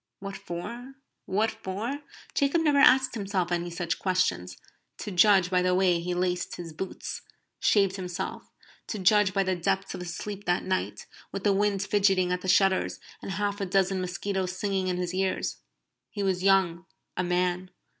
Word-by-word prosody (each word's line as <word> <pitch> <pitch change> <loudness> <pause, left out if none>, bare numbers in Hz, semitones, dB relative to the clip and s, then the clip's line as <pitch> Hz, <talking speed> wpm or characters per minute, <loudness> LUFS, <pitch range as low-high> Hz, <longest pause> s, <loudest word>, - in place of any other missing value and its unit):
"What 195 0 -6
for? 240 +10 -7 0.3
What 215 +3 +1
for?" 220 +9 -4 0.3
Jacob 280 +4 +2
never 290 -3 +4
asked 265 -1 +6
himself 195 -5 -2
any 175 0 -1
such 175 0 -3
questions, 185 - 0 0.4
to 210 - -6
judge 190 -1 +5
by 180 -1 +3
the 180 0 +2
way 180 -2 +3
he 175 +1 -3
laced 180 0 -1
his 170 -2 -8
boots; 190 +5 -5 0.4
shaved 195 -2 +3
himself; 180 -2 -5 0.4
to 215 - -3
judge 205 +1 +4
by 195 +1 +1
the 190 -1 0
depth 190 +2 -1
of - - -6
his 175 -1 -5
sleep 205 0 -6
that 175 0 +1
night, 185 0 -2 0.3
with 195 - -5
the 205 - +4
wind 200 0 +1
fidgeting 195 -3 +2
at 180 0 -1
the 185 - -6
shutters, 190 0 +3 0.2
and 195 - -5
half 205 +2 -2
a - - 0
dozen 190 0 +1
mosquitoes 185 +1 -2
singing 195 -2 -1
in 180 -1 0
his 180 0 -2
ears. 190 0 -1 0.5
He 205 - -4
was 190 -2 0
young 190 -2 +2 0.3
a 185 - 0
man. 180 +1 0
190 Hz, 175 wpm, -27 LUFS, 180-200 Hz, 0.5 s, asked